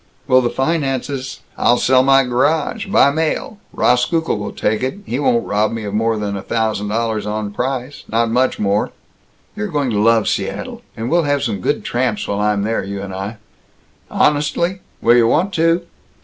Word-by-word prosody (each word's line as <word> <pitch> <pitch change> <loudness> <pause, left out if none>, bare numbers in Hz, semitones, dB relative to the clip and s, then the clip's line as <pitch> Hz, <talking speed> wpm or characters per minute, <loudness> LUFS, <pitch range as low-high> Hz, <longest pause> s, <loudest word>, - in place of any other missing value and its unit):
"Will 130 0 +5
the 120 - 0
finances 135 -2 -2
" - - -33
"I'll 120 - +4
sell 130 +1 +4
my 135 +1 +5
garage, 150 - 0
by 140 -7 +4
mail. 160 +7 -2
Rauskukle 160 +7 +1
will 105 -1 -4
take 105 0 -1
it. 130 +8 -2
He 125 - -2
won't 235 +9 +2
rob 105 +1 +1
me 115 -1 -4
of 100 -1 -5
more 110 +1 +1
than 105 -1 -3
a 100 - -4
thousand 110 -1 -1
dollars 110 0 -1
on 105 -1 -3
price 130 +3 -3
not 115 0 +1
much 130 +2 +1
more." 100 0 0 0.7
"You're 210 0 -3
going 145 -8 -1
to 105 - 0
love 115 0 +3
Seattle. - - -3 0.2
And 115 +3 -3
we'll 170 -2 +3
have 145 -1 +1
some 105 -7 -2
good - - -1
tramps 120 -3 -1
while 100 - -2
I'm 105 -1 +1
there, 115 +2 -1
you 100 +1 -5
and 95 -1 -6
I." 100 +4 -5 0.7
"Honestly? 150 +5 +1 0.2
Will 120 +1 +6
you 115 -1 +5
want 185 +10 +1
to?" 165 +1 +2
120 Hz, 190 wpm, -18 LUFS, 105-145 Hz, 0.7 s, Will